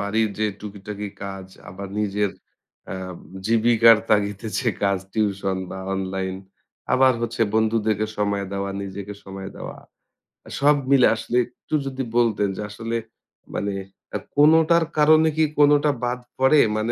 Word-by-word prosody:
বাড়ির 110 +2 +1
যে 110 - +2
টুকিটাকি 105 0 -7 0.2
কাজ 95 -1 -7 0.2
আবার 95 +2 -7
নিজের 105 -1 0 0.6
আ - - -3 0.5
জীবিকার 115 0 +5
তাগিদে 105 0 +1
যে 125 - +1
কাজ। 100 -1 +2
টিউশন 100 -3 0
বা 95 - -6 0.2
অনলাইন 95 0 -3 0.6
আবার 130 0 +5
হচ্ছে 115 0 -3
বন্ধুদেরকে 110 -1 +1
সময় 100 -1 0
দেওয়া, 100 0 -2
নিজেকে 100 +1 -7
সময় 95 0 -7
দেওয়া। - - -7 0.7
আ - - -11
সব 145 +1 +5 0.2
মিলে 135 -2 +6
আসলে 120 +2 -2
একটু 125 +5 -15
যদি 135 -1 -3
বলতেন। 115 -4 +2
যে - - -5
আসলে 115 +3 -5 0.6
মানে 100 0 -2 0.4
আ - - +2 0.2
কোনোটার 160 +3 +5
কারণে 155 +1 +6
কি 160 - +4 0.2
কোনোটা 145 0 +5
বাদ 125 +1 -1 0.2
পড়ে? 135 +3 +5 0.2
মানে 110 +2 -1
110 Hz, 140 wpm, -23 LUFS, 100-125 Hz, 0.7 s, মিলে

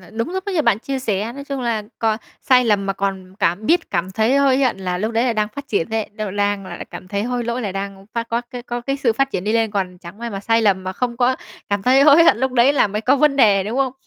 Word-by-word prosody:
là 180 - -16
đúng 230 +8 -3
lúc 380 +1 -4
ấy 400 - -3
như 315 - +2
bạn 225 -4 +3
chia 270 +3 -4
sẻ, 220 -2 -2
nói 280 +1 -8
chung 275 -2 -4
là 230 -3 -1 0.2
cò 220 -1 +1 0.3
sai 250 -1 +4
lầm 205 -3 +1
mà 195 - 0
còn 195 -1 -4
cảm 195 +2 0
biết 330 +3 +2
cảm 180 0 -1
thấy 220 +7 +2
hối 275 -2 +3
hận 260 -7 +1
là 180 -2 -3
lúc 215 +4 -2
đấy 230 +2 +1
là 250 - +1
đang 215 -1 0
phát 280 +6 -9
triển 200 -2 -1
ấy, 220 -1 -2
đâu 210 -1 -4
lang 205 -1 -1
là - - -7
cảm 185 - -9
thấy 200 +1 -2
hối 245 0 -2
lỗi 235 +2 -2
là 200 -4 -3
đang 195 0 -6
phát 230 0 -2
có 230 +1 0
cái 245 0 -7
có 240 0 -4
cái 275 +3 -2
sự 265 -4 +1
phát 270 +4 0
triển 185 -5 -3
đi 215 - 0
lên, 225 -1 +1
còn 185 -3 -3
chẳng 175 +3 -12
may 235 0 -5
mà 195 -2 -5
sai 225 +2 +2
lầm 190 -3 +2
mà 185 - -3
không 240 +4 -3
có 255 +1 +2 0.3
cảm 200 -1 -1
thấy 260 +4 +5
hối 300 +3 +7
hận 280 - +5
lúc 260 +1 0
đấy 255 +3 +4
là 280 - +3
mới 210 +2 -3
có 265 +4 +3
vấn 285 0 +3
đề, 205 -6 +4
đúng 220 +5 -3
không? 265 -2 +1
225 Hz, 305 wpm, -20 LUFS, 200-255 Hz, 0.3 s, hối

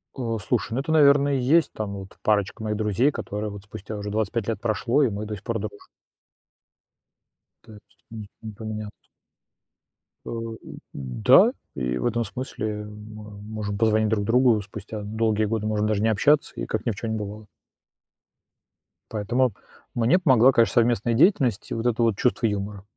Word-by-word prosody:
Э, 115 -4 -2
слушай, 110 -1 -1
ну 130 - 0
это, 150 +3 -3
наверное, 140 -2 +5
и - - +1
есть 155 +7 +3
там 105 -2 -4
вот 95 0 -10
парочка 105 0 0
моих 105 -1 -2
друзей, 110 +7 +2
которая 105 -3 -4
вот 100 -1 -9
спустя 105 +1 -8
уже 105 0 -5
25 110 +1 -1
лет 110 -3 -2
прошло, 120 +5 +1
и 125 - +3
мы 105 +1 -4
до 105 0 -5
сих 100 - -12
пор 115 -2 -2
дружим. 100 -1 -8 1.8
То 110 - -15
есть, 100 -1 -19
м, 110 -2 -8
не 110 -1 -7
поменялось. 110 0 -7 1.2
А, - - -7
у 115 -1 -4
у, - - -9 0.4
да, 65 -3 +4 0.2
и 60 -1 -2
в - - -3
этом 120 0 +1
смысле, 105 -2 -5
мы 105 0 -11
можем 105 -1 -5
позвонить 110 -1 +2
друг 105 -2 0
другу 120 -2 +4
спустя 105 +2 -8
долгие 110 0 0
годы, 110 0 -2
можем 105 0 0
даже 105 -1 0
не 110 - +3
общаться, 145 +8 +2
и - - -4
как - - -3
ни 120 - +1
в 100 - -6
чём 110 +2 -4
не 110 - -1
бывало. 105 +1 -7 1.6
Поэтому 115 +3 0 0.4
мне 120 +10 +3
помогла, 130 -6 +5
конечно, 115 -2 +3
совместная 120 -1 +2
деятельность 130 - +2
и - - 0
вот 115 +1 -3
это 120 -1 +1
вот 115 -4 +2
чувство 125 -2 +1
юмора, 100 -1 -2
110 Hz, 180 wpm, -24 LUFS, 105-120 Hz, 1.8 s, наверное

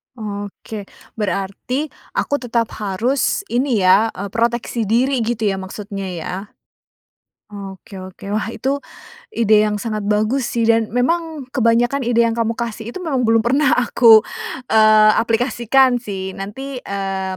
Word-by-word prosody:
Oke. 205 -1 -7 0.3
Berarti 210 +8 -2 0.2
aku 285 - 0
tetap 235 -2 -1
harus, 230 - 0
ini 240 -4 +1
ya, 190 +4 +5
eee, 200 +1 -6
proteksi 235 0 -1
diri 250 +5 +2
gitu 230 -1 -2
ya 195 -2 0
maksudnya 195 +1 -6
ya? 175 -3 -5 1.2
Oke 195 -1 -9
oke. 190 +2 -9
Wah, 215 0 -1
itu 270 +4 -2 0.6
ide 220 -2 +4
yang 210 - -1
sangat 215 0 -3
bagus 215 +5 +1
sih 235 -1 -1
dan 225 -1 +3
memang 315 +5 -1
kebanyakan 240 +1 +2
ide 235 -1 +3
yang 230 - +1
kamu 230 0 0
kasih 230 -1 -4
itu 240 - -7
memang 280 -6 0
belum 225 0 +3
pernah 275 +3 +3
aku, 230 -3 +6 0.5
eee, 215 -1 +6
aplikasikan 245 +2 +2
sih, 190 -4 -5
nanti, 250 +8 -6
eee, 195 -1 -3
225 Hz, 140 wpm, -19 LUFS, 200-245 Hz, 1.2 s, aku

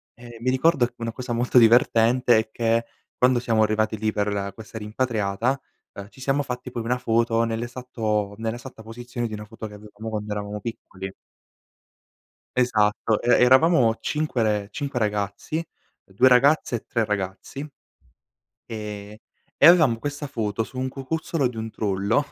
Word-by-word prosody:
E 120 -1 -12
mi 130 - +1
ricordo 130 0 +3
che 120 - -20
una 115 0 -3
cosa 125 0 -5
molto 120 +2 +1
divertente 120 +1 +5
è 110 0 0
che 115 0 +1 0.3
quando 125 -1 +4
siamo 115 -2 +1
arrivati 110 0 +1
lì 110 +1 0
per 100 -2 -2
questa 110 +1 -10
rimpatriata, 110 +2 -1 0.3
uhm, 100 0 -9
ci - - -19
siamo 135 +2 +1
fatti 125 0 -6
poi 120 - -4
una 125 +2 0
foto 115 -1 +1
nell'esatto 115 -3 -2
nell'esatta 115 +1 -6
posizione 120 +2 -5
di 110 - -8
una 105 0 -6
foto 110 0 -8
che 105 - -11
avevamo 105 +1 -9
quando 105 -1 -4
eravamo 105 0 -4
piccoli. 95 -4 -7 1.5
Esatto, 110 -3 +2
e 120 - +1
eravamo 130 -2 +5
5 150 -6 -1
re 105 -2 0
5 140 -4 -3
ragazzi, 105 +9 -2 0.4
2 105 +7 +4
ragazze 130 0 +4
e - - -9
3 115 -3 0
ragazzi, 100 +6 -4 1.1
ehm, 105 -2 -7 0.4
e - - +5
avevamo 155 -9 +7
questa 145 +4 -5
foto 110 -4 -2
su 130 - -12
un 130 0 -1
cucuzzolo 140 +2 -2
di 125 - -8
un 110 0 -4
trullo 100 +6 0
115 Hz, 155 wpm, -24 LUFS, 105-125 Hz, 1.5 s, avevamo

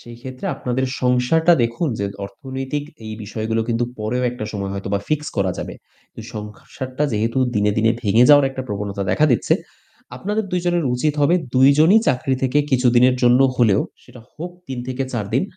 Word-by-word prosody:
সেই 120 0 -12
ক্ষেত্রে 130 0 -7
আপনাদের 130 -1 -2 0.2
সংসারটা 125 +7 +3
দেখুন 120 +8 -1
যে 100 - -1 0.2
অর্থনৈতিক 130 +7 -5 0.2
এই 110 - -6
বিষয়গুলো 110 +2 -2
কিন্তু 115 0 +1
পরেও 110 +4 -2
একটা 120 -3 -6
সময় 100 -2 -4
হয়তোবা 100 0 -2
ফিক্স 150 0 -1
করা 95 -2 +1
যাবে। - - -5 0.4
কিন্তু - - -10
সংসারটা 125 +6 -5
যেহেতু 115 +4 0 0.2
দিনে, 105 0 +2
দিনে 110 +1 +3
ভেঙে 110 +3 +4
যাওয়ার 145 -2 +6
একটা 130 0 -5
প্রবণতা 100 -1 -3
দেখা 155 - +3
দিচ্ছে, 115 - +2 0.6
আপনাদের 210 +8 -2
২ 180 - +1
জনের 175 -2 +1
উচিত 145 +4 0
হবে 145 +4 +4 0.2
২ 130 +1 +6
জনই 170 +8 +6
চাকরি 130 +1 +1
থেকে 135 +2 +2
কিছুদিনের 125 -1 +4
জন্য 125 +1 +5 0.2
হলেও, 110 -5 +3 0.2
সেটা 125 - -15
হোক 175 +3 -6 0.2
৩ 130 -2 -5
থেকে 130 +1 -2
৪ 110 -5 -2
দিন - - +3
125 Hz, 175 wpm, -20 LUFS, 110-135 Hz, 0.6 s, যাওয়ার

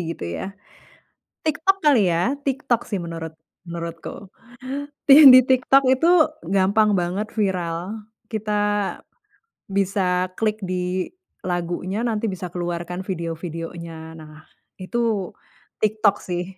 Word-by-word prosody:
gitu - - -8
ya, - - -4 1.0
TikTok 320 +5 +2
kali 250 -11 +5
ya, 180 +11 +1
TikTok 260 -3 0
sih 200 -3 -2
menurut 165 -1 -6 0.4
menurutku. 170 +3 -7 0.8
Tih 285 +2 +9
di 255 0 +10
TikTok 260 +1 +4
itu 265 +6 +1 0.5
gampang 205 +3 +3
banget 180 +5 -2
viral, 185 +1 -2 0.3
kita 215 -1 -3 1.2
bisa 190 -2 0
klik 215 -1 0
di 180 0 -2 0.4
lagunya, 175 +3 -2
nanti 225 -1 -1
bisa 185 -1 -5
keluar 175 -1 -2
kan 180 +1 -4
video-videonya. 165 -2 -5 0.3
Nah, 155 -1 -12 0.5
itu 220 0 -1 0.5
TikTok 215 -1 +3
sih. 175 -1 -3
190 Hz, 110 wpm, -22 LUFS, 175-220 Hz, 1.2 s, di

